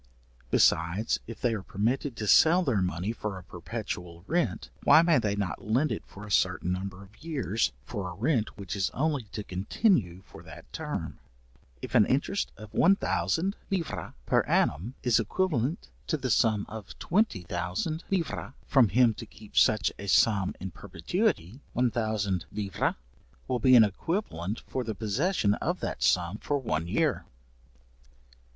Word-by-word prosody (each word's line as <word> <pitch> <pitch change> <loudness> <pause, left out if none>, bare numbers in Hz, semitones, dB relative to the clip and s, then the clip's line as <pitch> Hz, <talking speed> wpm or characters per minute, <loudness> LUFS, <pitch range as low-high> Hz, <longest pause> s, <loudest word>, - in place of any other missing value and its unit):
Besides, 85 - +2
if 115 - -8
they 120 -2 +2
are 105 - -3
permitted 115 +8 -1
to 110 - -4
sell 165 - +6
their 125 - +1
money 90 +3 -1
for 105 -3 -4
a 95 - -10
perpetual 90 -2 -6
rent, 175 +6 -1
why 160 - +7
may 170 -4 +4
they 105 -3 0
not 100 -4 -3
lend 125 +9 +1
it - - -2
for 105 +2 -11
a 105 - -9
certain 90 -2 +2
number 95 +1 -4
of 105 +8 -18
years, 135 - 0
for 95 +3 -4
a 90 - -8
rent 115 - 0
which 100 -1 -5
is 95 -2 0
only 145 -2 0
to 105 +1 -6
continue 95 - 0
for - - -13
that - - -13
term? - - -4 0.6
If - - -6
an - - +5
interest - - 0
of 110 -1 -11
1000 195 -1 +2
livres 185 -5 -3
per - - +3
annum 100 - +1
is 120 -2 +4
equivalent 150 - -1 0.2
to 155 - 0
the 130 -3 -2
sum 110 -2 +3
of 110 -3 -9
20000 100 - -1
livres 170 -8 -2
from 130 -6 +4
him 120 +1 +4
to - - -9
keep 105 -1 -15
such 110 - +4
a 100 - -6
sum 100 0 +3
in 95 0 -5
perpetuity, 130 - -2
1000 110 -7 0
livres 100 -2 -1 0.5
will 125 - 0
be 130 +2 +6
an 115 - +9
equivalent 105 - -2
for 130 - -4
the 110 -2 -4
possession 110 - +1
of - - -2
that - - -4
sum 90 +3 +2
for 145 - -1
one 85 - -2
year. - - +1
110 Hz, 160 wpm, -28 LUFS, 95-135 Hz, 0.6 s, an